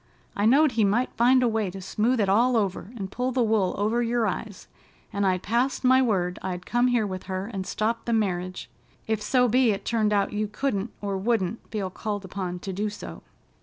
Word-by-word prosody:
I 205 +1 +2
knowed 285 +4 +5
he 225 -2 +1
might 215 +6 +1
find 255 +2 +4
a - - +4
way 220 -3 0
to 195 +2 -8
smooth 225 +6 0
it 205 - +2
all 235 +5 +3
over 200 -2 -1
and 195 -2 -5
pull 250 +3 -1
the 250 -1 +1
wool 215 -4 +1
over 220 +4 +1
your 235 -1 +1
eyes, 205 0 -4 0.5
and 200 -1 +1
I'd 185 -1 0
passed 240 +7 0
my 260 +1 +5
word 185 -7 0
I'd 180 -1 -4
come 240 +1 +2
here 240 -3 +2
with 185 -2 -5
her 185 0 -2
and 190 -1 -4
stop 230 +2 -1
the 235 - -1
marriage, 185 -4 -1 0.4
if 220 -1 -1
so 250 +3 +3
be 250 +1 +3
it 200 -2 -1
turned 220 -3 +1
out 200 -1 +1
you 210 +1 -1
couldn't 210 -1 -2
or 200 -2 -2
wouldn't 220 -1 0
feel 195 -4 -3
called 205 0 -4
upon 185 -1 -4
to 190 - -5
do 210 +3 -1
so. 205 - -9
215 Hz, 215 wpm, -26 LUFS, 195-235 Hz, 0.5 s, knowed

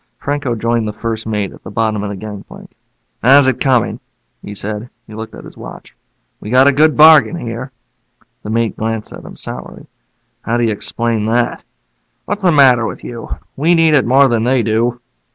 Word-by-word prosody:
Franco 145 -4 -2
joined 115 0 -1
the 105 - -4
first 110 +1 -4
mate 105 -3 -2
at - - -17
the - - -8
bottom 110 -3 -1
of 105 - -4
the 100 - -5
gangplank. 105 0 -10 0.5
"How's 135 +2 +6
it 130 - 0
coming?" 130 -4 +1 0.4
he 105 - -9
said. 105 +3 -5 0.2
He 110 - -13
looked 110 +1 -8
at - - -11
his - - -13
watch. - - -11 0.4
"We 105 - -8
got 130 +3 +5
a - - +6
good 155 +2 +3
bargain 155 -4 +7
here." 125 -3 -6 0.7
The - - -8
mate 115 0 0
glanced 110 -1 -4
at - - -10
him - - -11
sourly. - - -8 0.6
"How 115 - -1
do 120 - 0
you 115 - +1
explain 110 +1 -2
that?" 120 +1 0 0.6
"What's 205 +1 -3
the 180 -2 +3
matter 130 -6 +5
with - - -8
you? 120 -1 -8 0.3
We 165 +5 +2
need 165 -1 +4
it 135 -5 +3
more 135 +3 +5
than 115 -3 0
they 125 0 +2
do." 115 +2 0
115 Hz, 195 wpm, -16 LUFS, 110-135 Hz, 0.7 s, bargain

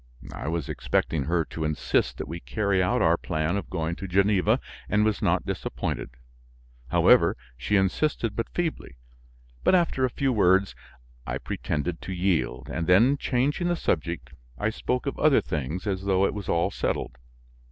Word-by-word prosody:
I - - -6
was 80 -3 -2
expecting 75 -5 -1
her 85 +1 +1
to 80 - -5
insist 75 -1 0
that - - -5
we 85 - -5
carry 100 -1 0
out 90 - +2
our 85 +1 +4
plan 80 0 -1
of 100 - -4
going 85 -2 -2
to 100 - -6
Geneva, 95 0 +3 0.3
and 105 +1 +3
was 110 -2 0
not - - +1
disappointed. - - -3 0.8
However, - - +4 0.2
she 65 +11 -1
insisted 105 +3 +1
but 115 - -2
feebly; 165 - -3 0.7
but, - - +5
after 170 -7 +1
a 130 - +3
few 135 +2 0
words, 95 -2 +3 0.5
I - - -2
pretended 80 +3 -3
to 95 - -5
yield, 85 -10 0
and 85 0 -3
then 115 +10 +5
changing 140 +6 0
the 175 - +1
subject, 80 - -2 0.3
I 105 +1 0
spoke 125 +4 -2
of 140 - -3
other 155 -3 +5
things, 75 - -4
as 95 -2 -2
though 95 0 +3
it - - 0
was 105 -2 -6
all 85 0 +1
settled. 60 - -3
95 Hz, 170 wpm, -26 LUFS, 80-110 Hz, 0.8 s, but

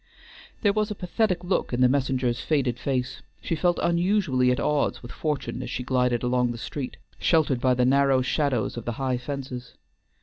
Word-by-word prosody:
There 205 -2 +4
was 215 0 0
a 210 - -4
pathetic 185 -1 0
look 180 -7 -1
in 120 - 0
the 125 - +7
messenger's 130 -2 0
faded 130 -6 0
face, 130 -1 -2 0.2
she 165 - -2
felt 175 +2 +1
unusually 170 -7 +2
at 125 - +1
odds 150 -3 0
with 120 - -8
fortune 150 -3 -3
as - - -5
she 125 - -3
glided 125 -1 +1
along 125 0 +1
the 120 - -6
street, 130 +2 -5 0.2
sheltered 150 -7 +2
by 130 -1 +3
the 125 0 +2
narrow 135 0 +4
shadows 130 -5 0
of 120 - -6
the 120 - -2
high 130 0 -1
fences. 130 -2 -6
130 Hz, 190 wpm, -25 LUFS, 125-155 Hz, 0.2 s, the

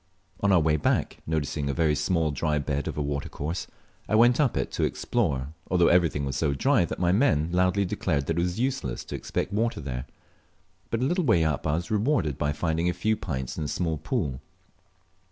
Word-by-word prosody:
On 100 - +2
our 95 - +6
way 80 -1 +2
back, - - 0
noticing 75 -2 -1
a 70 - -1
very 80 -3 +2
small 80 +1 +1
dry 75 +2 0
bed 70 -1 -2
of - - -4
a 75 - 0
watercourse, 70 +3 -3 0.4
I - - +2
went 120 +4 +5
up 140 -6 +2
it - - -1
to - - -1
explore, 65 0 0 0.2
although 90 -2 +4
everything 85 -5 +3
was 70 -2 -3
so 70 0 +1
dry 125 - +3
that - - -5
my 90 -1 +2
men 90 - +2
loudly 90 +2 +2
declared 70 -5 -1
it 80 - 0
was 90 +3 -1
useless 135 +2 -2
to - - -6
expect 95 - -3
water 115 +3 0
there; 65 -4 -5 0.8
but 115 - -1
a - - +2
little 175 +6 +1
way 105 - +4
up 75 -3 -1
I 75 - +2
was 85 +3 -4
rewarded 105 - +1
by 75 0 +1
finding 80 +3 0
a - - 0
few 110 +3 0
pints 70 - -4
in - - -2
a - - -2
small 80 0 -1
pool. 65 -2 -2
80 Hz, 210 wpm, -26 LUFS, 75-100 Hz, 0.8 s, our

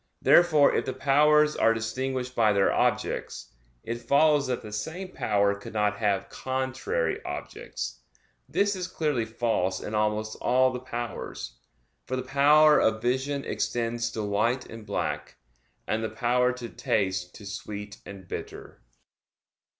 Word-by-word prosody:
Therefore 155 -5 +6
if - - 0
the 130 - -3
powers 150 +2 +4
are 115 0 +3
distinguished 125 +3 -3
by 110 -3 +4
their 100 -1 +3
objects, - - -1 0.3
it 120 +1 -4
follows 145 +3 +3
that 125 -1 -2
the 105 -1 -9
same 160 - -4
power 100 - +1
could 100 +1 -9
not 105 -1 +1
have 100 -3 0
contrary 130 -10 -2
objects. - - -6 0.5
This 200 0 +1
is 180 -1 -4
clearly 150 -10 -1
false 110 -5 -1
in 105 - -6
almost 105 0 -1
all 130 +1 +3
the 125 - -3
powers; 120 - -6 0.5
for 130 - -2
the 130 - -3
power 150 +3 +5
of 110 0 +2
vision 130 +4 -1
extends 115 -1 -1
to 110 - -3
white 110 +5 0
and 115 -1 -11
black, 75 -2 -3 0.5
and 110 +1 -1
the 110 - -1
power 125 +2 +1
to 125 -1 -6
taste 95 -5 -1
to 105 - -11
sweet 105 +1 -7
and 95 -2 -11
bitter. - - -8
120 Hz, 145 wpm, -27 LUFS, 105-130 Hz, 0.5 s, Therefore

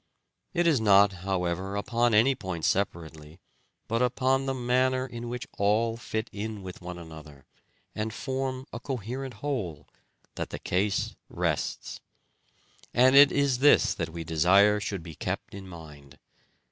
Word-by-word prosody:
It 175 0 +2
is 155 -8 +3
not, 100 -2 +5 0.2
however, 95 +1 -1
upon 115 +2 +1
any 120 +6 +5
point 95 -9 -5
separately, 80 -4 -2 0.5
but 115 +1 0
upon 130 +2 +1
the 135 - 0
manner 130 +1 +1
in 120 -2 -7
which 125 0 -5
all 110 +3 +2
fit 110 -1 -4
in 105 -1 -5
with 90 0 -9
one 90 0 -7
another, 80 -4 -12 0.5
and 110 +1 -3
form 130 +1 -3
a - - -5
coherent 130 0 -5
whole, 90 - -3 0.5
that - - -5
the - - -5
case 100 +2 -1
rests; - - -2 1.0
and 130 +2 +5
it 140 0 +9
is 140 -3 +1
this 145 +2 +5
that 85 -1 -4
we 85 0 -6
desire 95 +6 +4
should 100 -4 -4
be 80 -1 -9
kept - - -4
in 95 -1 -9
mind. 75 -6 -12
105 Hz, 145 wpm, -27 LUFS, 90-130 Hz, 1.0 s, it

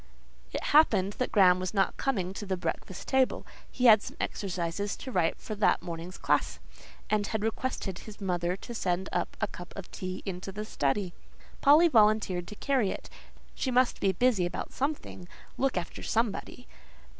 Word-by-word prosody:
It - - -3
happened 205 -10 +5
that 255 - 0
Graham 185 -3 +6
was 185 +3 -4
not 195 -1 +2
coming 190 -9 -1
to 205 - -6
the 190 -1 -1
breakfast 185 +1 -4
table; 265 -1 +2 0.2
he 250 - -1
had 220 -3 +8
some - - -9
exercises 185 +1 -2
to 260 - -8
write 175 -7 +1
for 215 - -6
that 210 0 +2
morning's 170 +1 -6
class, - - +1 0.5
and 210 -1 +2
had 220 -1 -2
requested 220 -4 -2
his 215 -2 -11
mother 180 -2 -1
to 240 - -8
send 185 -3 -1
a - - +1 0.2
cup 175 0 -10
of 195 -2 -8
tea 185 0 -5
into 190 0 -5
the 210 +2 -5
study. 175 +2 -1 0.5
Polly 305 +4 +7
volunteered 210 - +3
to 210 - -8
carry 260 -4 +1
it: - - -6 0.4
she 265 - -2
must 255 0 +2
be 195 - +2
busy 195 -2 +2
about - - -6
something, 275 - -3 0.3
look 270 -6 0
after 175 -1 -4
somebody. 230 +2 -2
200 Hz, 170 wpm, -29 LUFS, 180-235 Hz, 0.5 s, had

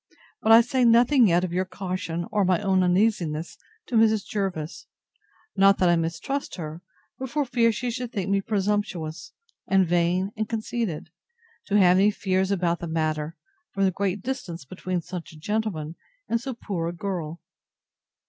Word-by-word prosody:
But 220 - +3
I 225 +1 +10
say 250 +2 0
nothing 240 +2 +5
yet 175 0 +3
of 180 -2 -3
your 185 +1 +1
caution, 180 -2 -4
or 205 -1 +2
my 180 -2 +2
own 190 -1 +2
uneasiness, 180 -4 +1 0.3
to 245 - -4
Mrs. 220 -2 +3
Jervis; 185 -6 -4 0.7
not 195 0 +5
that 180 - +3
I 175 - +5
mistrust 170 - -3
her, 160 -1 -7 0.4
but 265 0 -4
for 290 +3 0
fear 240 -2 +3
she 240 +3 -3
should 250 0 -4
think 195 -6 -3
me 195 0 +2
presumptuous, 200 - -2 0.3
and 195 -1 +4
vain 175 +3 +1
and 215 -1 -3
conceited, 215 -8 -3 0.6
to 205 - +2
have 180 -2 +6
any 200 +2 +5
fears 190 -2 0
about 175 -3 0
the 170 - -5
matter, 155 0 -2 0.4
from 195 - +1
the 190 - +3
great 195 +1 -2
distance 185 - -5
between 185 +3 -3
such 180 -1 -8
a - - -13
gentleman, 175 -5 -2 0.3
and 230 - 0
so 265 -1 -5
poor 185 -7 -3
a 170 - -3
girl. 175 -3 -4
190 Hz, 170 wpm, -25 LUFS, 170-220 Hz, 0.7 s, I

